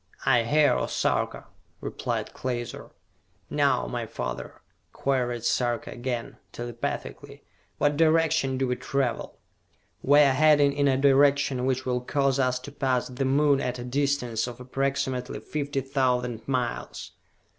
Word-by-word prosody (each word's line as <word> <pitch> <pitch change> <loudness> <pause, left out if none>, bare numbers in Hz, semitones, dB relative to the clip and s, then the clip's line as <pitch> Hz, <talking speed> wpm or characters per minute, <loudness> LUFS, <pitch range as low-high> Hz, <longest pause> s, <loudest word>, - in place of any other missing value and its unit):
"I 125 -3 +5
hear, 150 +4 +4
O - - -1
Sarka!" - - -1 0.3
replied - - -4
Klaser. 120 -2 -5 0.6
"Now, - - +2
my - - -4
father," - - -6 0.3
queried 125 -4 -1
Sarka 120 0 0
again, 120 -1 -4
telepathically, 140 +3 -6 0.3
"what 145 0 +1
direction 160 -4 +3
do 135 - +1
we 125 0 -1
travel?" 135 -1 -2 0.6
"We 145 +2 +6
are 140 -2 +5
heading 145 0 +5
in 140 0 +1
a 135 -1 +3
direction 140 -1 +3
which 130 0 -1
will 125 -1 0
cause 135 +1 0
us 130 -1 +2
to 145 - -9
pass 130 -3 0
the 130 +2 -2
Moon 140 +1 +3
at 125 0 -2
a 120 - -6
distance 125 -3 -1
of 120 0 -8
approximately 130 0 -2
fifty 145 -2 -3
thousand 125 -4 -1
miles!" 125 -3 -3
130 Hz, 135 wpm, -26 LUFS, 125-140 Hz, 0.6 s, We